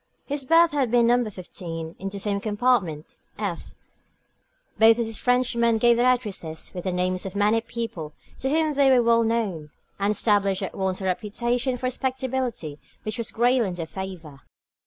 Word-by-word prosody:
His 285 -1 -3
berth 330 +4 +5
had 280 -4 0
been 240 0 +4
No. 240 -1 +3
15 170 -4 -7
in 195 - -4
the 200 - -6
same 200 0 0
compartment, 205 -8 0 0.2
f. 200 -5 -5 1.0
Both 225 +1 +7
these 225 -2 -3
Frenchmen 235 -2 +2
gave 235 +1 +4
their 240 +2 +3
addresses 195 -10 -4
with 180 0 -6
the 185 - 0
names 180 0 -1
of 195 0 -6
many 210 +3 +3
people 225 -11 -6 0.3
to 265 - -1
whom 310 +1 +1
they 280 -1 +4
were 250 -2 +5
well 230 0 +4
known, 210 -9 -1 0.3
and 200 +1 +1
established 205 -2 +2
at 190 - -4
once 190 0 -2
a - - -5
reputation 240 +7 -1
for 255 - -5
respectability 255 - -2 0.2
which 215 +1 -3
was 230 - -2
greatly 240 0 +2
in 180 - -4
their 170 -2 -4
favour. 165 -6 -8
220 Hz, 175 wpm, -24 LUFS, 185-245 Hz, 1.0 s, Both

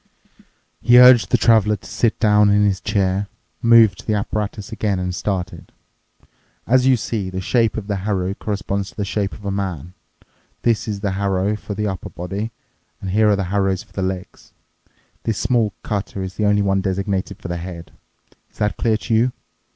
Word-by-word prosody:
He 120 0 +6
urged 125 -2 +8
the 125 - +3
traveler 110 -2 +4
to 95 - -15
sit 115 -2 0
down 105 -2 +4
in 105 0 +4
his 100 -1 0
chair, 100 -1 0 0.3
moved 115 -5 +5
to - - -13
the 110 - +1
apparatus 105 0 -3
again, 105 -3 -1
and 90 0 -2
started, 90 -2 -4 0.9
"As 130 +2 +3
you 130 -1 +5
see, 105 -3 -3
the 95 0 -4
shape 115 +4 +1
of 110 - -4
the 100 -1 -2
harrow 95 -1 -1
corresponds 100 -1 -3
to - - -18
the 100 - -2
shape 100 +1 -2
of 105 - -11
a 100 - -1
man. 90 -4 -4 0.7
This 115 -2 +1
is 105 -2 -4
the 100 -2 -1
harrow 100 +1 0
for 105 -1 -7
the 105 +1 -2
upper 95 -3 -4
body, 100 +5 -5 0.5
and 95 - -5
here 105 +2 +4
are 105 - +4
the 100 - -1
harrows 95 -2 +1
for - - -26
the 95 - -3
legs. 95 -1 -5 0.7
This 110 -3 -2
small 115 -4 +1
cutter 100 -2 -3
is 95 0 -6
the 105 - -1
only 105 0 +3
one 95 -1 +1
designated 95 0 -2
for - - -7
the 85 0 -3
head. 85 -1 -8 0.6
Is - - -27
that 105 -3 -1
clear 110 -2 +1
to 115 - -3
you?" 120 +3 +3
100 Hz, 195 wpm, -20 LUFS, 95-110 Hz, 0.9 s, urged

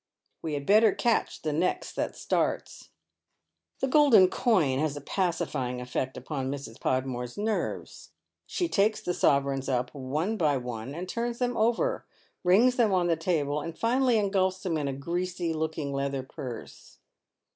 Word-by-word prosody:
We 155 -2 -3
had 140 -1 -4
better 215 +3 +5
catch 235 -2 0
the 155 -1 -1
next 170 +5 -1
that - - -2
starts." - - -2 0.9
The 270 - +2
golden 260 -10 +6
coin 160 - +2
has 150 -1 -1
a - - -6
pacifying 145 -7 -1
effect 130 +1 -3
upon 135 0 -4
Mrs. 140 -5 -6
Podmore's 125 -2 -2
nerves. 215 +1 -3 0.4
She 350 - -1
takes 210 -6 +2
the 180 - -2
sovereigns 140 -3 +1
up 125 -1 -1
one 150 +10 -2
by 150 -6 +2
one, 125 +1 -5
and 180 +2 -5
turns 235 +3 -2
them 245 -1 -1
over, 235 - +1 0.4
rings 225 +8 +4
them 230 -4 +3
on 180 -2 +2
the 165 - +3
table, 150 -3 0
and 165 +2 -6
finally 245 +1 +2
engulfs 190 -2 +1
them 180 -4 -1
in 150 -2 -1
a 135 - -2
greasy 175 +4 -2
looking 155 -2 -3
leather 140 -1 -2
purse. 130 -4 -9
160 Hz, 155 wpm, -28 LUFS, 140-210 Hz, 0.9 s, golden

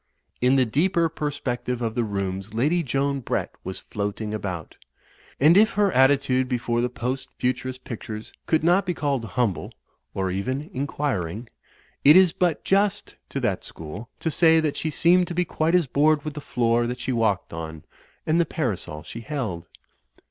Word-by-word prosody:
In 125 +2 +4
the 130 -2 +4
deeper 165 - +2
perspective 135 -5 -3
of 115 -2 -2
the 120 0 0
rooms 100 0 -3
Lady 150 +9 +2
Joan 140 -1 0
Brett 125 - -2
was 95 +1 -5
floating 105 +1 -4
about. 90 -6 -5 0.6
And 155 +5 +6
if 215 +2 +5
her 205 0 +2
attitude 130 -1 +3
before 120 -2 0
the 125 - 0
Post 125 +2 -4
Futurist 130 +1 -2
pictures 110 -1 -7
could 160 -1 +2
not 175 +4 +4
be 180 - 0
called 140 -5 -1
humble, 110 -5 -1 0.4
or 95 -1 -1
even 130 - -3
inquiring, 120 - -2 0.5
it 150 +3 +8
is 185 -3 +6
but 175 -4 0
just 200 +1 +1
to 140 - -3
that 105 -7 -1
school 90 +9 -9
to 160 - 0
say 160 0 +5
that 155 -2 0
she 160 - -2
seemed 175 +3 +4
to 175 - -5
be 180 0 +1
quite 160 +1 +1
as 180 -3 +4
bored 150 +3 +2
with 155 - -3
the 150 - -6
floor 120 -2 +1
that 125 +1 -4
she 130 - -2
walked 110 -8 0
on, 80 -1 -6 0.4
and 160 +2 +3
the - - +2
parasol 95 - -3
she 110 - -8
held. 110 - -4
130 Hz, 175 wpm, -24 LUFS, 110-155 Hz, 0.6 s, it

